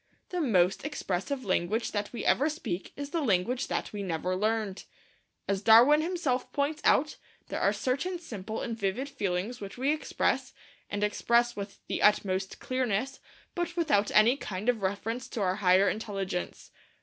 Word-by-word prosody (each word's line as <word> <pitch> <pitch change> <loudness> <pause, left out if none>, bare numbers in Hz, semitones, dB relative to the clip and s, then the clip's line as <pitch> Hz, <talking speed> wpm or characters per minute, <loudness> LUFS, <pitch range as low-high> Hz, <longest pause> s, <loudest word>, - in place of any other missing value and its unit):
The 360 -1 -2
most 185 - +2
expressive 265 -2 -3
language 195 +4 0
that 205 -1 -2
we 240 - -5
ever 290 +4 +3
speak 245 - -4
is 285 0 -6
the 335 - 0
language 245 +2 +1
that - - -3
we 205 - -4
never 180 0 -2
learned. 215 0 -1 0.6
As 195 -1 0
Darwin 240 +8 +7
himself 315 -7 -1
points 295 +2 -1
out, 300 +3 +3 0.3
there - - -3
are - - +4
certain 280 +8 -1
simple 220 - -6
and 230 - -3
vivid 225 +6 -2
feelings 205 -1 -3
which 200 +2 -7
we 270 +3 +1
express, 310 - -1 0.3
and 205 0 -2
express 235 +3 +2
with 200 0 -6
the - - -3
utmost 190 -2 +2
clearness, 255 0 -1 0.3
but 345 -1 -3
without 290 -12 +2
any 230 +5 +5
kind 205 -2 -3
of 235 -4 +1
reference 220 +6 -2
to 235 - -4
our 185 0 +1
higher 190 0 +4
intelligence. 195 -4 -3
225 Hz, 160 wpm, -29 LUFS, 195-270 Hz, 0.6 s, Darwin